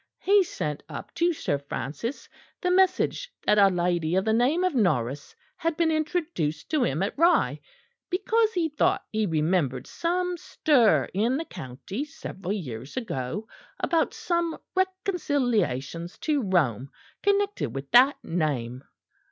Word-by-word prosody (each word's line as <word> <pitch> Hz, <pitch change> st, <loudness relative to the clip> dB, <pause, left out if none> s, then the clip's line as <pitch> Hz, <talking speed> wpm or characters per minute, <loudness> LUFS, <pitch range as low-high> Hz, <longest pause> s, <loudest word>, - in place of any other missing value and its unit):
He 400 Hz, 0 st, +4 dB
sent 150 Hz, -, -4 dB
up 145 Hz, -, -8 dB
to 345 Hz, +1 st, +2 dB
Sir 145 Hz, -, -1 dB
Francis 140 Hz, -, -5 dB, 0.3 s
the 360 Hz, -, 0 dB
message 380 Hz, +6 st, +2 dB
that 210 Hz, -, +4 dB
a 200 Hz, -, +8 dB
lady 175 Hz, -2 st, 0 dB
of 190 Hz, +2 st, +1 dB
the 220 Hz, -, +2 dB
name 265 Hz, +10 st, +2 dB
of 370 Hz, -, +1 dB
Norris 145 Hz, -, 0 dB, 0.2 s
had 330 Hz, -1 st, -1 dB
been 330 Hz, -1 st, +3 dB
introduced 310 Hz, -, -2 dB
to 305 Hz, -5 st, +2 dB
him 155 Hz, -, 0 dB
at 200 Hz, -, -2 dB
Rye; 340 Hz, +2 st, +3 dB, 0.5 s
because 440 Hz, +4 st, +1 dB
he 345 Hz, -3 st, +1 dB
thought 300 Hz, -1 st, +1 dB
he 215 Hz, -1 st, 0 dB
remembered 155 Hz, -5 st, 0 dB
some 360 Hz, +1 st, -1 dB
stir 265 Hz, -8 st, +3 dB
in 230 Hz, +7 st, +1 dB
the 325 Hz, -, -3 dB
county 170 Hz, -, -6 dB
several 195 Hz, -, -7 dB
years 135 Hz, -, -6 dB
ago 210 Hz, -, -3 dB, 0.3 s
about 330 Hz, -2 st, +1 dB
some 340 Hz, -2 st, -1 dB, 0.2 s
reconciliations 245 Hz, -, -1 dB
to 300 Hz, -3 st, 0 dB
Rome 140 Hz, -, +1 dB, 0.3 s
connected 400 Hz, -, 0 dB
with 135 Hz, 0 st, -6 dB
that 260 Hz, +4 st, +7 dB
name. 135 Hz, -7 st, -2 dB
220 Hz, 140 wpm, -26 LUFS, -, 0.5 s, a